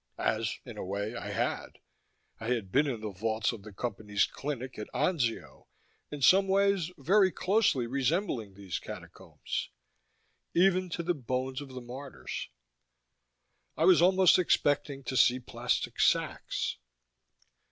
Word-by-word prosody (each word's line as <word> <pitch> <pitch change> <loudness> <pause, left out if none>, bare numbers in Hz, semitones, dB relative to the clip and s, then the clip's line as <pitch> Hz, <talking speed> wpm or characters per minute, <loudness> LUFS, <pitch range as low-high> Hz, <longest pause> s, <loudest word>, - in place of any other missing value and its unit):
As, - - -1
in - - -9
a - - -3
way, 100 +4 -3
I 105 -3 -5
had: 100 - -2 0.6
I 115 - -6
had 115 -6 -1
been 145 +6 +3
in 120 -6 -3
the 105 -1 -4
vaults 110 +3 -1
of 115 -4 -8
the 110 +1 -11
Company's 105 -1 -1
clinic 130 -3 -5
at 105 - -5
Anzio, 130 -11 -1 0.4
in 145 -2 -6
some 195 +5 +6
ways 195 -3 +2
very 185 +7 +4
closely 185 - +2
resembling 130 - -1
these 100 -2 -5
Catacombs - - -6 0.9
Even 185 0 +3
to 170 0 -3
the 175 +1 +1
bones 130 -1 -3
of 145 - -8
the 130 -1 -7
martyrs. 130 +3 -7 1.3
I - - +3
was 180 -3 +6
almost 185 0 +6
expecting 145 -5 +1
to 130 - -4
see 125 +1 +5
plastic 125 - -2
sacks. - - +1
130 Hz, 140 wpm, -30 LUFS, 115-175 Hz, 1.3 s, some